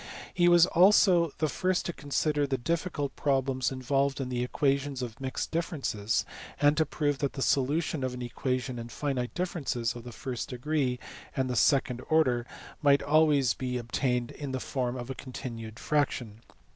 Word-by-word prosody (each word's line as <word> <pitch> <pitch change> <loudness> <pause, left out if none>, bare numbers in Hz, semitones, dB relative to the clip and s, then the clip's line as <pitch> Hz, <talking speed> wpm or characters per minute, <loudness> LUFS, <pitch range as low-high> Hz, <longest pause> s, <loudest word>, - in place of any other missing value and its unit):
He 175 -1 +4
was 175 -1 +7
also 180 -2 +5
the 155 - +1
first 185 +5 0
to 175 - -2
consider 145 0 0
the 135 -1 0
difficult 160 +1 -2
problems 135 -2 0
involved 135 +2 0
in 130 -2 -3
equations 135 +2 0
of 120 0 -7
mixed 130 -1 -3
differences, 135 -10 -1 0.3
and 145 +1 +4
to 160 -2 +2
prove 145 -2 -1
that 140 - -1
the 135 - -5
solution 145 +2 +1
of 130 -1 -2
an 125 - -5
equation 125 0 -2
in 115 0 -7
finite 130 -3 -3
differences 140 -10 -2
of 120 - -8
the 120 - -8
first 125 +1 -5
degree 130 0 -1 0.4
and 130 -1 0
the - - -1
second 125 -1 +2
order 130 -7 +3 0.3
might 140 -2 +5
be - - -6
always 150 -4 +4
obtained 125 0 -1
in 140 -3 -6
the 130 - -1
form 125 -2 -2
of 125 +1 -5
a - - -2
continued 115 -3 -7
fraction. 125 -7 -1
135 Hz, 170 wpm, -29 LUFS, 125-150 Hz, 0.4 s, was